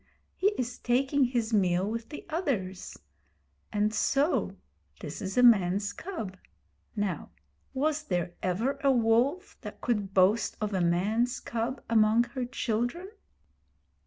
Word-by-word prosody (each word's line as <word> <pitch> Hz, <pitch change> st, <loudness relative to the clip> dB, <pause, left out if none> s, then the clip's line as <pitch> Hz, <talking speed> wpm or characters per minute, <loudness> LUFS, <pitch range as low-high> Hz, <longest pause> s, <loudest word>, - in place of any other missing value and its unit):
He 385 Hz, -, +2 dB
is 250 Hz, 0 st, -3 dB
taking 265 Hz, +3 st, +2 dB
his 240 Hz, -2 st, -1 dB
meal 185 Hz, -2 st, +2 dB
with 230 Hz, +1 st, -4 dB
the 295 Hz, -, -8 dB
others. 245 Hz, -, -3 dB, 0.7 s
And 210 Hz, +1 st, +1 dB
so 280 Hz, +8 st, +1 dB, 0.4 s
this -, -, -7 dB
is 190 Hz, +1 st, -4 dB
a 250 Hz, -, +5 dB
man's 200 Hz, -3 st, +4 dB
cub. 220 Hz, -, -6 dB, 0.6 s
Now, 205 Hz, -4 st, -2 dB, 0.4 s
was 300 Hz, +3 st, 0 dB
there 175 Hz, -, -2 dB
ever 230 Hz, +10 st, -1 dB
a 275 Hz, -, +4 dB
wolf 250 Hz, -, +1 dB
that -, -, -8 dB
could 210 Hz, -5 st, -1 dB
boast 195 Hz, +4 st, +3 dB
of 210 Hz, -1 st, -2 dB
a 190 Hz, -, +1 dB
man's 210 Hz, +8 st, +1 dB
cub 235 Hz, +3 st, -3 dB
among 225 Hz, 0 st, +4 dB
her 245 Hz, +1 st, -4 dB
children?' 245 Hz, -, -2 dB
230 Hz, 130 wpm, -29 LUFS, 200-260 Hz, 0.7 s, a